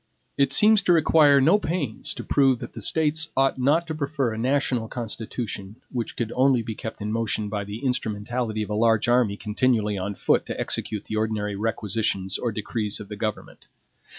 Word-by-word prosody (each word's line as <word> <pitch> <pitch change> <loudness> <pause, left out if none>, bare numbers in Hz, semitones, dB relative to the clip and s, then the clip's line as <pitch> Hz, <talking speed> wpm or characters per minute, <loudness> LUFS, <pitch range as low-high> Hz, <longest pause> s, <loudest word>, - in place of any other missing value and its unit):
It 140 -1 +2
seems 215 +5 +6
to 180 - +3
require 155 -3 +5
no 165 +10 +4
pains 155 - -3
to - - -6
prove 135 -3 +3
that 120 -1 -9
the - - -8
States 160 0 +1
ought 135 0 +2
not 150 +6 +2
to 160 - -4
prefer 140 -5 -1
a - - -6
national 125 -2 0
Constitution 110 -3 -6 0.2
which 120 -3 -4
could 115 -2 -3
only 130 -2 +3
be 110 0 -5
kept 110 0 -7
in 105 - -3
motion 110 -2 -1
by 105 -1 -3
the 105 +6 -7
instrumentality 110 -2 -2
of 105 - -7
a - - 0
large 115 +1 +2
army 120 -4 +2
continually 105 -2 0
on 100 +2 -4
foot - - +1
to - - -5
execute 105 -2 -1
the 110 - -4
ordinary 105 -2 -1
requisitions 105 -3 -2
or 120 - -1
decrees 105 0 -2
of 105 - -10
the 105 - -6
government. 110 0 -5
115 Hz, 190 wpm, -24 LUFS, 105-135 Hz, 0.2 s, seems